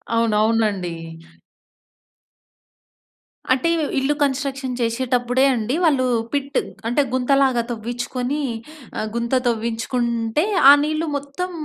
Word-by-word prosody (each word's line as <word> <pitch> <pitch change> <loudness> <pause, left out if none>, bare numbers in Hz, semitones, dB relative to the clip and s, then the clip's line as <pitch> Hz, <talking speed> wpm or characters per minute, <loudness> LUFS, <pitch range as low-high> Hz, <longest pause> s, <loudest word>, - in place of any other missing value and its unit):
అవునవునండి. 215 -4 +1 2.6
అంటే 265 +6 0
ఇవ్ 325 - 0
ఇళ్ళు 270 +2 +2
కన్‌స్ట్రక్షన్ 270 -1 -2
చేషేటప్పుడే 245 +2 +1
అండి 235 +2 -1
వాళ్ళు, 280 -6 +3 0.3
పిట్ 280 0 -1 0.3
అంటే 245 +5 +2
గుంతలాగా 260 -1 +2
తవ్వించుకొని 245 +4 -3 0.6
ఆహ్, 215 - -2
గుంత 235 +2 0
తవ్వించుకుంటే, 235 +2 -1 0.3
ఆ - - +12
నీళ్లు 310 +2 -1
మొత్తం 285 +6 -5
250 Hz, 95 wpm, -21 LUFS, 230-275 Hz, 2.6 s, ఆ